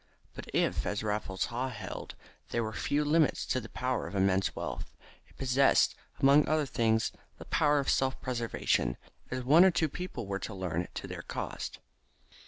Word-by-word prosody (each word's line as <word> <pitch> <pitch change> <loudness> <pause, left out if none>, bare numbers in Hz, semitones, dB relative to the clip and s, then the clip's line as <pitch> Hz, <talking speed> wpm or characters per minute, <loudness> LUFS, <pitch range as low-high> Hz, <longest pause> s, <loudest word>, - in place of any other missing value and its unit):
But - - -9
if, - - +1
as 105 +1 -2
Raffles 105 -3 -1
Haw 125 +2 -2
held, 125 - -7 0.3
there 120 - 0
were 110 0 -4
few 150 +5 0
limits 155 0 +3
to 130 - 0
the 115 - -10
power 130 -5 -2
of 90 - -7
immense 95 0 +2
wealth, - - -5 0.4
it - - -23
possessed, 135 +1 +4 0.3
among 140 +2 +6
other 155 0 +2
things, 110 -3 +1 0.3
the - - -10
power 150 -1 +3
of 140 - 0
self 130 0 +1
preservation, 115 - 0 0.3
as 130 0 -3
one 155 +8 +7
or 190 - +7
two 160 -3 +1
people 180 - -5
were 100 0 -3
to 110 - -6
learn 90 -2 -2
to - - -4
their - - -6
cost. - - -5
125 Hz, 180 wpm, -31 LUFS, 105-140 Hz, 0.4 s, one